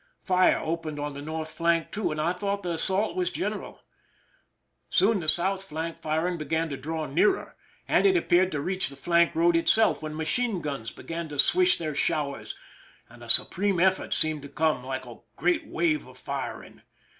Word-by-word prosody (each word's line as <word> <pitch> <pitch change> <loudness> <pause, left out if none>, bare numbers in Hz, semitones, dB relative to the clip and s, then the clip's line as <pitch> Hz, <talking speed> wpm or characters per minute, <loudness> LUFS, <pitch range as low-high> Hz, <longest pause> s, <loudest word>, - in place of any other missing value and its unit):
Fire 185 -1 +4
opened 160 -2 -4
on 145 0 -3
the 140 - -7
north 155 +1 -5
flank 170 -1 +1
too, 210 - -1
and 155 - -4
I 165 +3 +1
thought 200 +2 -3
the 175 - -2
assault 190 - +1
was 365 -1 0
general. - - -5 1.1
Soon 200 +3 +3
the 160 - -6
south 190 +3 +1
flank 165 -1 -5
flr 160 +2 0
ing 175 -2 -3
began 160 +2 -1
to 140 - -4
draw 155 +4 -4
nearer, 170 - +1 0.3
and - - +4
it 375 -2 +4
appeared 185 - +3
to 145 - -1
reach 185 +2 0
the 140 - -9
flank 170 +4 +2
road 170 +1 +3
itself, 220 +6 +3
when 155 0 -5
machine 195 +7 0
guns 140 -8 -4
began 165 +4 -6
to 145 - -7
swish 180 +5 +4
their 155 -2 -3
showers, 145 -1 -1 0.5
and - - -14
a - - -11
supreme 195 -1 +2
effort 190 +1 +2
seemed 155 -1 +1
to 140 - -10
come, 155 -4 0
like 130 0 -4
a - - -11 0.2
great 330 -4 0
wave 315 -3 0
of - - -15
firing. - - -6
165 Hz, 190 wpm, -27 LUFS, 155-190 Hz, 1.1 s, Fire